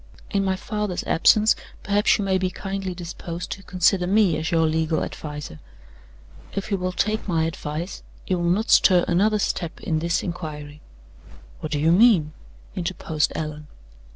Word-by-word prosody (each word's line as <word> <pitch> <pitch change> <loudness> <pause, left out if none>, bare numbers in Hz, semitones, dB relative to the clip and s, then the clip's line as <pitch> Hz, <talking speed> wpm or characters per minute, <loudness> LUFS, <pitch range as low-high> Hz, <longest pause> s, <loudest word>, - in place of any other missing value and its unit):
In 200 -1 +1
my 190 -1 +1
father's 210 -1 -3
absence, 215 +6 +4 0.3
perhaps 205 0 +3
you 205 - -2
may 190 -1 +2
be 185 0 0
kindly 195 0 -4
disposed 170 0 -6
to 195 - -5
consider 180 0 +1
me 200 -3 +3
as 160 - -2
your 165 -1 +3
legal 160 0 0
adviser. 150 - -7 0.9
If 200 +1 -4
you 200 - +2
will 185 0 -1
take 215 +4 -1
my 165 -4 +1
advice, 160 +2 -4 0.2
you 185 -2 0
will 170 0 +1
not 210 +6 +1
stir 180 -2 +6
another 210 +5 +3
step 175 -4 -2
in 160 -1 -1
this 170 +1 0
inquiry." 150 -4 -6 0.8
"What 155 - -6
do 150 - 0
you 160 +3 +3
mean?" 180 -6 +5 0.4
interposed 170 -4 -1
Allan. 150 -1 -5
175 Hz, 160 wpm, -23 LUFS, 160-195 Hz, 0.9 s, stir